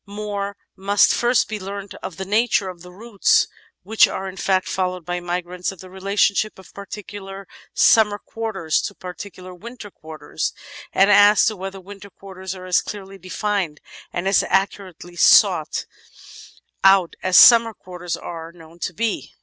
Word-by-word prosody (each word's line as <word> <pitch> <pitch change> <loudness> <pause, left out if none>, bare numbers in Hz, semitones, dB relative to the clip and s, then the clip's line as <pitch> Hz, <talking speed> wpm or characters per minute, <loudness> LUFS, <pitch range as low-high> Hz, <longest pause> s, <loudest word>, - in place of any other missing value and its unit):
More 200 -1 -5 0.2
must 200 +1 +3
first 240 +1 +2
be 215 -1 -5
learnt 200 +1 -7
of 180 - -7
the 190 - -5
nature 210 -1 +1
of 175 -2 -10
the 180 +1 -12
routes 205 +2 +1 0.4
which 220 +4 +4
are 190 - -5
in 190 - -8
fact 190 -1 0
followed 185 -2 -3
by 175 0 -3
migrants, 180 +1 -4
of 190 - -14
the 185 0 -12
relationship 200 +2 0
of 190 - -16
particular 200 -1 -9 0.3
sununer 210 -2 +4
quarters 195 -8 -2
to 205 - -6
particular 185 0 -9
winter 220 +2 -11
quarters, 160 -2 -6 0.4
and 195 +2 +4
as 205 +1 +6
to 215 - 0
whether 195 0 -7
winter 200 +1 -12
quarters 190 -1 -9
are 185 0 -10
as 180 -1 +2
clearly 195 -1 -9
defined 185 -3 -3 0.3
and 175 +2 -3
as 195 - +4
accurately 190 -3 -2
sought - - +4 1.0
out 195 -3 +4
as 185 -1 +3
siunmer 230 -2 +8
quarters 180 -2 -6
are 165 -1 -8
known 165 0 -17
to 180 - -4
be. 230 0 -3
195 Hz, 160 wpm, -21 LUFS, 180-205 Hz, 1.0 s, siunmer